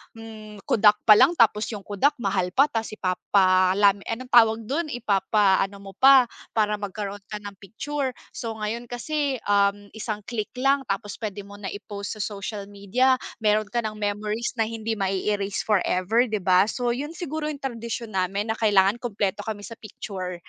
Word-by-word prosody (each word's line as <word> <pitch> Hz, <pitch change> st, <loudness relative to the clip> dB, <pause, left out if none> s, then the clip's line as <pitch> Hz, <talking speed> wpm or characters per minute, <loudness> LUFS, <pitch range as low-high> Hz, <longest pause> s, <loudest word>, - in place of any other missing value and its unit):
hmm, 215 Hz, -2 st, -11 dB
Kodak 210 Hz, -1 st, +4 dB
pa 215 Hz, -, +10 dB
lang 275 Hz, -, +6 dB
tapos 215 Hz, -5 st, +4 dB
'yung 210 Hz, -, -5 dB
Kodak 205 Hz, +9 st, +1 dB
mahal 190 Hz, -4 st, -1 dB
pa, 275 Hz, +3 st, +5 dB
ta's 225 Hz, -1 st, -3 dB
ipapalami 190 Hz, +1 st, +3 dB
anong 250 Hz, +3 st, -4 dB
tawag 225 Hz, -2 st, +6 dB
dun? 310 Hz, +5 st, -1 dB
Ipapa-ano 200 Hz, -3 st, +1 dB
mo 195 Hz, 0 st, -10 dB
pa 265 Hz, 0 st, +7 dB, 0.3 s
para 210 Hz, -1 st, +2 dB
magkaroon 205 Hz, 0 st, -5 dB
ka 210 Hz, -1 st, -6 dB
ng 205 Hz, -1 st, -9 dB
picture. 270 Hz, +7 st, -4 dB, 0.2 s
So 230 Hz, -, -4 dB
ngayon 215 Hz, +3 st, -3 dB
kasi, 275 Hz, +2 st, -2 dB
um, 200 Hz, 0 st, +2 dB
isang 215 Hz, -1 st, -4 dB
click 220 Hz, -3 st, -4 dB
lang 275 Hz, +1 st, +2 dB
tapos 200 Hz, 0 st, -3 dB
pwede 205 Hz, -2 st, -4 dB
mo 200 Hz, +1 st, -12 dB
na 195 Hz, -2 st, -5 dB
i-post 205 Hz, +1 st, -7 dB
sa -, -, -2 dB
social 205 Hz, 0 st, -5 dB
media, 205 Hz, +6 st, +1 dB, 0.2 s
meron 215 Hz, -1 st, +2 dB
ka 240 Hz, -, 0 dB
ng 215 Hz, -1 st, -4 dB
memories 210 Hz, +2 st, -2 dB
na 220 Hz, -, +2 dB
hindi 225 Hz, 0 st, -3 dB
ma-eerase 195 Hz, +1 st, -1 dB
forever, 210 Hz, +3 st, +2 dB
'di 215 Hz, -2 st, -2 dB
ba? 185 Hz, +1 st, +4 dB
So 245 Hz, +1 st, -1 dB
'yun 280 Hz, +6 st, -4 dB
siguro 315 Hz, -3 st, -4 dB
'yung 295 Hz, -2 st, -6 dB
tradisyon 235 Hz, -3 st, -5 dB
namin 195 Hz, +4 st, -1 dB
na -, -, -2 dB
kailangan 205 Hz, 0 st, +3 dB
kumpleto 205 Hz, -4 st, -2 dB
kami 210 Hz, -1 st, -5 dB
sa 230 Hz, -, -9 dB
picture. 190 Hz, -4 st, -7 dB
210 Hz, 175 wpm, -24 LUFS, 200-235 Hz, 0.3 s, pa